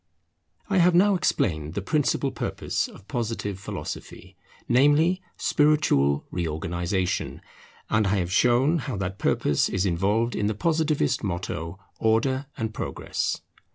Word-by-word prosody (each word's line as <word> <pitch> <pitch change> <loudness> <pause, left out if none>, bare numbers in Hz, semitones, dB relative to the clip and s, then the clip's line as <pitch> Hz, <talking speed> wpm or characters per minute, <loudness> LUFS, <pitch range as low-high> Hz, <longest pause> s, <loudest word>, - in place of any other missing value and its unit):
I 195 -2 +2
have 175 0 +5
now 200 +3 +5
explained 80 - 0
the 100 - -1
principal 140 +1 +1
purpose - - -2
of 95 - -15
Positive 115 -6 -3
Philosophy, 95 -1 -7 0.3
namely, 145 +8 +4 0.2
spiritual 145 - +2
reorganization; 85 +2 -2 0.5
and 110 -2 +2
I 100 - +2
have 90 -2 -1
shown 125 - +3
how 110 - -4
that 95 +1 -4
purpose 70 - +1
is 95 0 0
involved 100 +6 +1
in 105 - 0
the 105 - -1
Positivist 155 -2 +1
motto, 85 -2 -4 0.2
Order 130 +5 +1
and 110 -1 -3
Progress. - - -3
110 Hz, 125 wpm, -25 LUFS, 90-145 Hz, 0.5 s, have